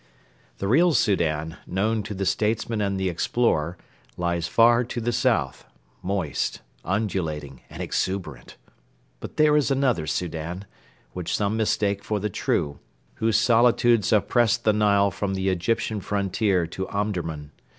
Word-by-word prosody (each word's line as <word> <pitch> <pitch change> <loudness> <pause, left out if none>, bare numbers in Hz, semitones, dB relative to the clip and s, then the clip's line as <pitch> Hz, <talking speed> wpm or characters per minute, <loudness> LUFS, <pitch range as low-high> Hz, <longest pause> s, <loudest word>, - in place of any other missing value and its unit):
The 100 - -3
real 160 - +4
Soudan, 80 -6 0
known 110 +4 0
to 105 0 -6
the 95 +1 -2
statesman 110 +3 0
and 100 -1 -1
the 95 - 0
explorer, 85 -2 0 0.4
lies 85 -1 -1
far 120 +6 +5
to 120 0 -5
the 120 +1 -1
south - - 0 0.4
moist, 90 -6 -2 0.2
undulating, 80 -8 -3
and - - -6
exuberant. 85 -10 -3 0.6
But - - -9
there 150 -1 +5
is 150 -2 +2
another 130 - +1
Soudan, 85 +3 -4 0.5
which 90 -2 -2
some 105 +1 0
mistake 100 -2 0
for 105 +1 -2
the 105 +1 -3
true, 70 -4 -1 0.4
whose 110 -1 +2
solitudes 120 -1 +3
oppress 115 +2 +3
the 110 -2 +1
Nile 100 -1 +3
from 100 +1 -3
the 95 0 0
Egyptian 100 +3 -1
frontier 100 -2 0
to 95 +3 -5
Omdurman. 85 -8 -3
100 Hz, 140 wpm, -24 LUFS, 90-110 Hz, 0.6 s, far